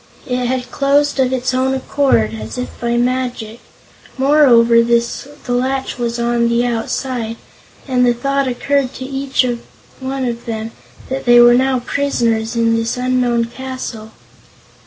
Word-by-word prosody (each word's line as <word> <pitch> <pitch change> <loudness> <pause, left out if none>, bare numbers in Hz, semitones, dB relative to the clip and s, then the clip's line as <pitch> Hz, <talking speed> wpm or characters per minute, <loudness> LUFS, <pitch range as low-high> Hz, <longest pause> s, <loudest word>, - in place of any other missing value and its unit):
It 250 -1 -1
had 250 0 -3
closed 285 +1 +1
of 260 -1 +2
its 255 0 -1
own 260 +1 +1
accord, 260 - +1
as 110 0 -7
if 125 0 -3
by 235 0 0
magic. 245 -2 -2 0.6
Moreover, 255 -5 +5
the 235 0 +3 0.5
latch 260 +1 -1
was 235 -1 -2
on 235 0 +1
the 235 +1 +1
outside, 230 0 -3 0.5
and 250 -2 +2
the 245 - +4
thought 275 +2 0
occurred 270 +1 -1
to 260 - -6
each 270 -1 0 0.5
one 265 0 -3
of 235 -1 -4
them 225 0 -4 0.4
that 265 +1 -4
they 240 -1 +7
were 240 0 +8
now 260 0 +2
prisoners 235 -4 -1
in 230 0 +2
this 230 +2 -1
unknown 250 -2 +1
castle. 245 -3 -7
245 Hz, 145 wpm, -17 LUFS, 235-265 Hz, 0.6 s, were